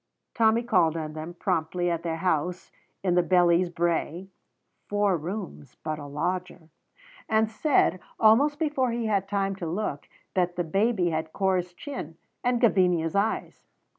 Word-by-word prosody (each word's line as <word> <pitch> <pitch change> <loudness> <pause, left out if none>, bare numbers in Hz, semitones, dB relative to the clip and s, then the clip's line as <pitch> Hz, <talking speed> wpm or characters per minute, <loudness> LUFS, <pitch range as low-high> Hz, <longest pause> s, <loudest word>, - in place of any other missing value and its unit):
Tommy 225 0 +3
called 175 -9 +2
on 155 -1 -4
them 160 +3 -7
promptly 175 +2 -1
at 170 -1 -1
their 165 -1 -2
house 175 +1 -1 0.3
in 180 -2 +2
the 180 - +4
Bellies 175 0 +3
Brae 170 +1 -1 0.6
(four 205 -2 +2
rooms, 170 - -6
but 155 -1 -3
a 145 - -8
lodger), 175 +3 -3 0.6
and 220 0 +2
said, 225 - +2 0.2
almost 265 +7 +5
before 290 -5 0
he 235 0 -2
had 200 -3 0
time 195 -1 -1
to 170 - -4
look, 170 -5 -3 0.2
that 180 -1 +1
the 175 - 0
baby 195 +1 +1
had 160 0 -3
Corp's 185 -2 0
chin 175 - -7 0.3
and 245 -1 +2
Gavinia's 180 -8 +3
eyes. 205 +3 -1
180 Hz, 150 wpm, -26 LUFS, 165-215 Hz, 0.6 s, almost